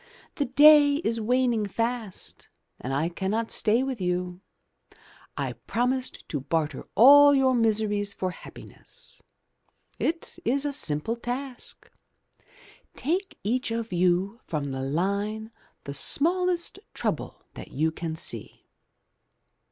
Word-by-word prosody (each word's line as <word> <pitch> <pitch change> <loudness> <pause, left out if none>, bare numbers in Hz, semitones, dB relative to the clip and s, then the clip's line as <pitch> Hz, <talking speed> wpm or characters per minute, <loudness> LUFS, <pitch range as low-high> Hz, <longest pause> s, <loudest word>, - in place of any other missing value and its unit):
*The 285 - +1
day 290 +2 +7
is 230 0 -1
waning 240 -2 +1
fast, 230 -1 -4 0.3
and 130 - -5
I 145 +4 +1
cannot 195 +6 -2
stay 230 +4 +2
with 265 -5 -4
you. 180 0 -2 1.0
I - - -2
promised 255 +2 -2
to 145 - -2
barter 150 +3 -2
all 285 +4 +8
your 265 -1 +3
miseries 215 -3 +1
for 185 -2 -3
happiness. - - -11 0.8
It 330 +1 -2
is 275 +5 +1
a 290 - -1
simple 175 - 0
task. 245 +2 -6 1.0
Take 360 +8 -2
each 250 +5 0
of 230 -2 -3
you 180 +5 +1
from 155 -3 -2
the 135 0 -4
line 200 +9 -2 0.3
the 140 - -6
smallest 350 - 0 0.2
trouble - - -3
that - - -9
you 160 +3 0
can 160 0 -5
see." - - -3
225 Hz, 120 wpm, -26 LUFS, 180-265 Hz, 1.0 s, all